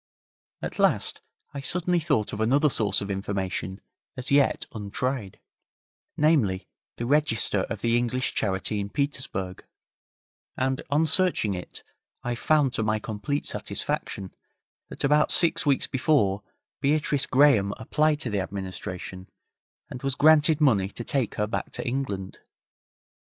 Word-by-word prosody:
At -, -, -5 dB
last -, -, +2 dB, 0.3 s
I 140 Hz, -, -5 dB
suddenly 175 Hz, +4 st, 0 dB
thought 145 Hz, -10 st, 0 dB
of 105 Hz, -, -3 dB
another 140 Hz, +6 st, +3 dB
source 105 Hz, -4 st, +1 dB
of 100 Hz, 0 st, -4 dB
information 95 Hz, -1 st, -3 dB, 0.4 s
as 130 Hz, +1 st, -5 dB
yet 140 Hz, -1 st, +3 dB
untried 110 Hz, 0 st, -3 dB, 0.8 s
namely, 135 Hz, -, +2 dB, 0.3 s
the 120 Hz, -, -3 dB
register 145 Hz, -5 st, +2 dB
of -, -, -5 dB
the 115 Hz, 0 st, +2 dB
English 120 Hz, +1 st, 0 dB
Charity 100 Hz, +1 st, -1 dB
in 100 Hz, 0 st, -3 dB
Petersburg, 130 Hz, -9 st, -3 dB, 0.9 s
and 130 Hz, 0 st, 0 dB
on 150 Hz, +3 st, +3 dB
searching 165 Hz, -, +4 dB
it, 90 Hz, -1 st, -8 dB, 0.4 s
I 120 Hz, -, -1 dB
found, 140 Hz, +1 st, +2 dB
to -, -, -1 dB
my 110 Hz, 0 st, +1 dB
complete 110 Hz, +7 st, -3 dB
satisfaction, 95 Hz, -2 st, -4 dB, 0.6 s
that -, -, -6 dB
about 150 Hz, +2 st, +3 dB
six 170 Hz, -3 st, +3 dB
weeks 140 Hz, -2 st, +3 dB
before 125 Hz, -8 st, +1 dB, 0.4 s
Beatrice 145 Hz, -1 st, +1 dB
Graham 130 Hz, -8 st, +4 dB
applied 150 Hz, +5 st, +1 dB
to 120 Hz, -, -3 dB
the 105 Hz, -, 0 dB
administration, 95 Hz, -1 st, -6 dB, 0.6 s
and 125 Hz, -, -7 dB
was 135 Hz, -1 st, -1 dB
granted 155 Hz, 0 st, +5 dB
money 105 Hz, -11 st, +3 dB
to 120 Hz, -, -7 dB
take 130 Hz, -2 st, -1 dB
her 105 Hz, -, 0 dB
back 110 Hz, -, -4 dB
to -, -, -4 dB
England. 120 Hz, -7 st, -3 dB
125 Hz, 135 wpm, -26 LUFS, 100-145 Hz, 0.9 s, granted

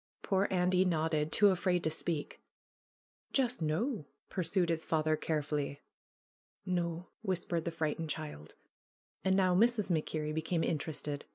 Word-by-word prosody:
Poor 195 Hz, 0 st, +2 dB
Andy 180 Hz, 0 st, +3 dB
nodded, 160 Hz, -3 st, +1 dB
too 205 Hz, -1 st, +6 dB
afraid 180 Hz, -1 st, +1 dB
to 160 Hz, -, +1 dB
speak. 160 Hz, -1 st, -3 dB, 0.9 s
"Just 250 Hz, -6 st, +2 dB
noo?" 165 Hz, -, 0 dB, 0.2 s
pursued 185 Hz, -1 st, +1 dB
his 165 Hz, -1 st, +1 dB
father 155 Hz, -1 st, +2 dB
carefully. 150 Hz, -2 st, -2 dB, 0.8 s
"No," 175 Hz, -1 st, -1 dB
whispered 175 Hz, -5 st, -1 dB
the 170 Hz, -, -1 dB
frightened 160 Hz, 0 st, -2 dB
child. 150 Hz, -, -6 dB, 0.7 s
And 190 Hz, 0 st, +3 dB
now 185 Hz, -2 st, +4 dB
Mrs. 215 Hz, 0 st, +3 dB
MacKerrie 155 Hz, -1 st, -1 dB
became 160 Hz, +1 st, 0 dB
interested. 150 Hz, -2 st, -2 dB
165 Hz, 125 wpm, -33 LUFS, 155-185 Hz, 0.9 s, too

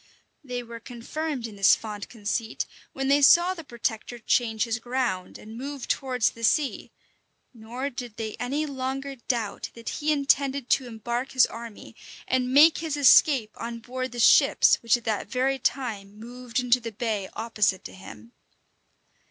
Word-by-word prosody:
They 250 Hz, -3 st, -5 dB
were 235 Hz, 0 st, -9 dB
confirmed 255 Hz, +3 st, -5 dB
in 215 Hz, -3 st, -8 dB
this 195 Hz, -, +6 dB
fond 210 Hz, -2 st, -7 dB
conceit 220 Hz, 0 st, -3 dB, 0.3 s
when 270 Hz, 0 st, -3 dB
they 280 Hz, +1 st, +4 dB
saw 345 Hz, +6 st, +6 dB
the 335 Hz, -3 st, -9 dB
protector 235 Hz, -2 st, -4 dB
change 225 Hz, -1 st, +1 dB
his 230 Hz, 0 st, -2 dB
ground, 240 Hz, -6 st, -2 dB
and 220 Hz, +1 st, -11 dB
move 275 Hz, +2 st, -6 dB
towards 255 Hz, -4 st, 0 dB
the 230 Hz, -, -12 dB
sea; 285 Hz, +4 st, +1 dB, 0.6 s
nor 245 Hz, +4 st, -5 dB
did 245 Hz, -3 st, -8 dB
they 220 Hz, -2 st, -4 dB
any 275 Hz, +5 st, -1 dB
longer 270 Hz, 0 st, -4 dB
doubt 235 Hz, -4 st, -3 dB
that 230 Hz, 0 st, -7 dB
he 305 Hz, 0 st, -1 dB
intended 280 Hz, -2 st, +1 dB
to 260 Hz, -, +2 dB
embark 240 Hz, +3 st, -4 dB
his 255 Hz, -2 st, +6 dB
army, 230 Hz, -2 st, -10 dB, 0.3 s
and 255 Hz, -1 st, 0 dB
make 300 Hz, +4 st, +6 dB
his 315 Hz, -2 st, -3 dB
escape 270 Hz, -4 st, +5 dB
on 235 Hz, 0 st, -5 dB
board 255 Hz, +2 st, -5 dB
the 240 Hz, -, -7 dB
ships -, -, +5 dB
which 230 Hz, +1 st, +3 dB
at 240 Hz, -, -14 dB
that 220 Hz, -2 st, -2 dB
very 265 Hz, +3 st, 0 dB
time 210 Hz, -7 st, -3 dB
moved 245 Hz, +2 st, -5 dB
into 250 Hz, 0 st, +3 dB
the 230 Hz, -1 st, -6 dB
bay 215 Hz, -3 st, -3 dB
opposite 215 Hz, -4 st, 0 dB
to -, -, -8 dB
him. 115 Hz, -, -12 dB
245 Hz, 165 wpm, -26 LUFS, 225-270 Hz, 0.6 s, this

